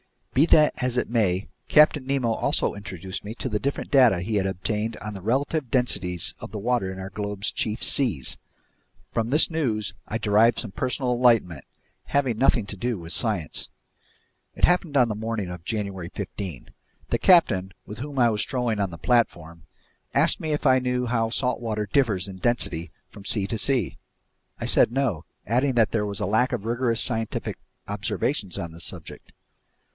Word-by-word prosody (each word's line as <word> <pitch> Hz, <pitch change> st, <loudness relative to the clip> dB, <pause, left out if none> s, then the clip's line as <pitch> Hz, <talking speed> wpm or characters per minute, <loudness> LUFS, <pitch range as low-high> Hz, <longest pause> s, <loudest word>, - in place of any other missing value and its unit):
Be 140 Hz, +5 st, +5 dB
that 155 Hz, -2 st, +5 dB
as 125 Hz, -1 st, -2 dB
it -, -, 0 dB
may, 100 Hz, -5 st, +1 dB, 0.2 s
Captain 150 Hz, -3 st, +4 dB
Nemo 135 Hz, -4 st, +1 dB
also 110 Hz, -, 0 dB
introduced 95 Hz, -2 st, -7 dB
me 105 Hz, +2 st, -7 dB
to 130 Hz, -, -4 dB
the 105 Hz, -2 st, -1 dB
different 140 Hz, +4 st, -3 dB
data 125 Hz, -10 st, +5 dB
he 105 Hz, +4 st, -2 dB
had 95 Hz, -1 st, +1 dB
obtained 105 Hz, +4 st, -2 dB
on 105 Hz, 0 st, -7 dB
the 95 Hz, -, -8 dB
relative 135 Hz, -, -1 dB
densities 100 Hz, -, +3 dB
of -, -, -9 dB
the 110 Hz, -, -5 dB
water 110 Hz, -3 st, 0 dB
in 95 Hz, -, -8 dB
our 95 Hz, +1 st, -7 dB
globe's 100 Hz, 0 st, -3 dB
chief 110 Hz, 0 st, -2 dB
seas. 105 Hz, -, +1 dB, 0.7 s
From 115 Hz, -1 st, -1 dB
this 150 Hz, +5 st, +3 dB
news 115 Hz, -10 st, -1 dB
I 115 Hz, -, -2 dB
derived 110 Hz, +2 st, +3 dB
some 110 Hz, -, -3 dB
personal 130 Hz, +3 st, -1 dB
enlightenment 115 Hz, -, +2 dB, 0.4 s
having 130 Hz, -6 st, 0 dB
nothing 125 Hz, -4 st, +3 dB
to 100 Hz, -, -7 dB
do 120 Hz, +2 st, -2 dB
with 85 Hz, -1 st, -9 dB
science. 100 Hz, -5 st, -1 dB, 0.9 s
It -, -, -11 dB
happened 175 Hz, -4 st, +1 dB
the 125 Hz, -3 st, +6 dB
morning 110 Hz, -2 st, -3 dB
of 90 Hz, -1 st, -8 dB
January 100 Hz, -5 st, -3 dB
15. 95 Hz, -, -7 dB, 0.4 s
The -, -, 0 dB
captain, 95 Hz, -, +4 dB
with 105 Hz, +1 st, -9 dB
whom 140 Hz, +2 st, -6 dB
I 120 Hz, -2 st, +5 dB
was 105 Hz, -1 st, -1 dB
strolling 125 Hz, -5 st, -1 dB
on 100 Hz, -2 st, 0 dB
the 85 Hz, -, -9 dB
platform, 85 Hz, -6 st, 0 dB, 0.5 s
asked -, -, +3 dB
me 155 Hz, -1 st, -2 dB
if 150 Hz, -, -3 dB
I 130 Hz, -1 st, +5 dB
knew 125 Hz, 0 st, -1 dB
how 115 Hz, -2 st, 0 dB
salt 125 Hz, +2 st, -1 dB
water 110 Hz, -3 st, -3 dB
differs 105 Hz, -9 st, +2 dB
in 95 Hz, -, -8 dB
density 90 Hz, -7 st, -1 dB, 0.2 s
from 100 Hz, -, -13 dB
sea 100 Hz, -2 st, +3 dB
to 115 Hz, -, -3 dB
sea. 125 Hz, -5 st, +1 dB, 0.6 s
I -, -, -3 dB
said -, -, +4 dB
no, 120 Hz, -, -1 dB, 0.2 s
adding 130 Hz, +5 st, +1 dB
that 115 Hz, -4 st, +3 dB
there 105 Hz, -2 st, 0 dB
was 100 Hz, -2 st, -4 dB
a -, -, 0 dB
lack 110 Hz, +6 st, +1 dB
of 100 Hz, -, -3 dB
rigorous 120 Hz, 0 st, +1 dB
scientific 115 Hz, -2 st, -1 dB, 0.3 s
observations 105 Hz, -, -2 dB
on 85 Hz, -, -5 dB
this 80 Hz, +1 st, -6 dB
subject. -, -, -9 dB
110 Hz, 180 wpm, -25 LUFS, 95-125 Hz, 0.9 s, the